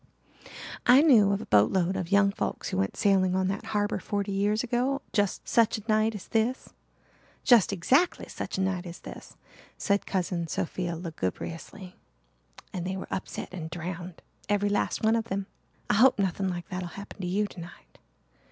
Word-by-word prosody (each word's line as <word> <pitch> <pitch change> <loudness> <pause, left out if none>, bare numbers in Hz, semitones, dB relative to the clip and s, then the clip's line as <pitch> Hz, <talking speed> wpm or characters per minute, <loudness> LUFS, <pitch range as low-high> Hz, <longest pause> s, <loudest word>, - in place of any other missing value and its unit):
"I 260 +4 +8
knew 225 -10 +6
of 200 - 0
a - - -7
boat 105 +1 +4
load 185 0 +1
of 185 -1 -4
young 200 0 +5
folks - - -3
who - - -3
went 95 +1 -1
sailing 190 -2 +3
on 190 0 +1
that 195 +2 -3
harbour 210 -1 0
forty 200 -1 -2
years 205 +3 +1
ago 250 +3 0
just 205 -3 0
such 230 -2 +3
a 215 - -9
night 215 0 +2
as 195 - -8
this 230 +3 0 0.7
just 235 -7 +5
exactly 260 - +2
such - - -5
a - - 0
night 190 -1 -1
as 170 +1 -9
this," - - -11 0.4
said 200 0 0
Cousin 180 -3 -1
Sophia 175 +1 -3
lugubriously, 170 - -6 0.8
"and 180 -3 -3
they 190 +1 -3
were - - -6
upset 185 - -5
and 165 -3 -5
drowned 175 +1 -6 0.3
every 205 0 +2
last 205 - -1
one 220 +1 +4
of 225 -1 0
them. 195 -1 -3 0.4
I - - +2
hope 245 +5 +5
nothing 190 -1 0
like 175 -1 -5
that'll 180 -1 -4
happen 200 +3 -9
to 180 - -3
you 200 +4 +1
tonight. 170 - -12
195 Hz, 180 wpm, -28 LUFS, 180-210 Hz, 0.8 s, I